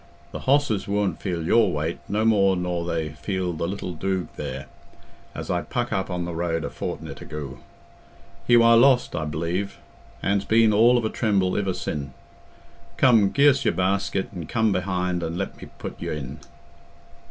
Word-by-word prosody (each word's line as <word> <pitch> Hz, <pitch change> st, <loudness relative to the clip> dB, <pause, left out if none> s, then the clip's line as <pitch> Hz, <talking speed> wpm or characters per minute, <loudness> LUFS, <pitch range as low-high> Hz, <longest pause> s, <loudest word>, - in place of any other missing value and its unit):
Th' -, -, -3 dB
hosses 135 Hz, -7 st, +1 dB
wooant 100 Hz, -4 st, 0 dB
feel 85 Hz, -4 st, -2 dB
your 110 Hz, +1 st, +4 dB
weight 80 Hz, +2 st, -2 dB
no 105 Hz, +2 st, +1 dB
more 100 Hz, -4 st, +4 dB
nor 90 Hz, -1 st, -2 dB
they 80 Hz, -2 st, -2 dB
feel 90 Hz, +4 st, -3 dB
the 85 Hz, +1 st, -2 dB
little 95 Hz, -1 st, -4 dB
doog 95 Hz, +2 st, -2 dB
there, 70 Hz, +1 st, -5 dB, 0.7 s
as -, -, -4 dB
I -, -, 0 dB
puck -, -, -3 dB
up 95 Hz, 0 st, -1 dB
on 90 Hz, -1 st, -2 dB
the 85 Hz, -, -4 dB
road 80 Hz, -1 st, -1 dB
a -, -, -4 dB
fortni't -, -, -6 dB
agoo. 70 Hz, -3 st, -7 dB, 0.9 s
He 120 Hz, -, +6 dB
war 115 Hz, 0 st, +6 dB
lost, 130 Hz, +1 st, +4 dB
I 80 Hz, -, -2 dB
b'lieve, 85 Hz, +6 st, -3 dB, 0.5 s
an's 100 Hz, 0 st, +1 dB
been 110 Hz, +1 st, +4 dB
all 120 Hz, +4 st, +5 dB
of 120 Hz, -, 0 dB
a -, -, +1 dB
tremble 100 Hz, -4 st, +1 dB
iver 95 Hz, -3 st, 0 dB
sin'. 70 Hz, -2 st, -4 dB, 0.8 s
Come, 115 Hz, -6 st, +5 dB
gi' 145 Hz, +1 st, +6 dB
us 135 Hz, 0 st, +1 dB
your -, -, +1 dB
basket 95 Hz, +1 st, 0 dB
an' 85 Hz, -4 st, -6 dB
come 110 Hz, +2 st, +1 dB
behind 90 Hz, -1 st, -1 dB
and 85 Hz, 0 st, -3 dB
let 95 Hz, -, -5 dB
me -, -, -9 dB
put -, -, -7 dB
y' -, -, -4 dB
in." 75 Hz, -1 st, -5 dB
95 Hz, 180 wpm, -24 LUFS, 85-105 Hz, 0.9 s, He